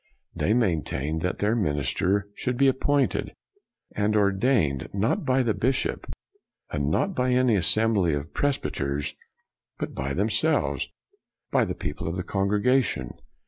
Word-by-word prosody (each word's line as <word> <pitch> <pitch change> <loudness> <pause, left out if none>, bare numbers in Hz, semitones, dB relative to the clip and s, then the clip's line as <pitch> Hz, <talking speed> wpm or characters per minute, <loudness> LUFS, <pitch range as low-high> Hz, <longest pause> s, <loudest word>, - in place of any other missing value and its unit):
They 110 - +1
maintained 80 - 0
that 90 +1 -1
their 105 +3 +1
minister 90 - 0
should 125 +3 -3
be 140 +1 +4
appointed 135 +1 +1 0.6
and 105 +1 +1
ordained 100 - +2
not 100 +4 0
by 130 0 +3
the 115 -3 +1
bishop, 130 +5 -1 0.6
and 70 -1 -1
not 195 - +1
by 125 -4 +1
any 125 -3 +3
assembly 100 -2 +2
of 70 +3 -6
pres 145 -1 +1
byters, 70 +1 -3 0.6
but - - -4
by 70 +1 -3
themselves, 105 - +1 0.6
by - - +3
the - - -4
people - - -5
of 85 - -2
the 90 - -3
congregation. 100 - +1
100 Hz, 140 wpm, -26 LUFS, 80-125 Hz, 0.6 s, be